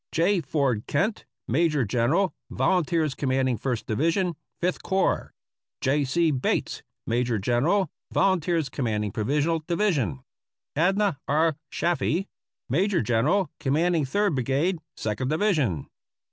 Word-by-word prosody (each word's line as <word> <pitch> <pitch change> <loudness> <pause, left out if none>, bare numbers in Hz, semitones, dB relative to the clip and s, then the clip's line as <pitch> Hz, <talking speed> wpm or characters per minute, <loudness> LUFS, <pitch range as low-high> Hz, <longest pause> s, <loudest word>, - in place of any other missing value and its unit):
J. 175 +3 +2
Ford 135 -6 0
Kent, 205 +9 0 0.2
Major 150 0 +2
General 130 - +1 0.2
Volunteers 165 -5 +1
Commanding 130 -2 0
First 125 -2 -2
Division, 165 - 0 0.2
Fifth 180 +1 -1
Corps. 190 0 0 0.3
„ - - -67
J. 145 +2 +2
C. 160 +5 +2
Bates, 130 -3 -1 0.2
Major 120 0 0
General 130 - +2 0.2
Volunteers 175 -5 +2
Commanding 110 -6 -2
Provisional 145 - 0
Division. 165 - 0 0.5
Adnah 190 +2 +2
R. 155 +2 +2
Chaffee, 175 +2 0 0.4
Major 185 - +1
General 130 - +1
Commanding 160 +3 +1
Third 200 +6 +1
Brigade, 140 +7 0 0.2
Second 110 +4 -2
Division. 155 - +1
150 Hz, 115 wpm, -26 LUFS, 130-175 Hz, 0.5 s, J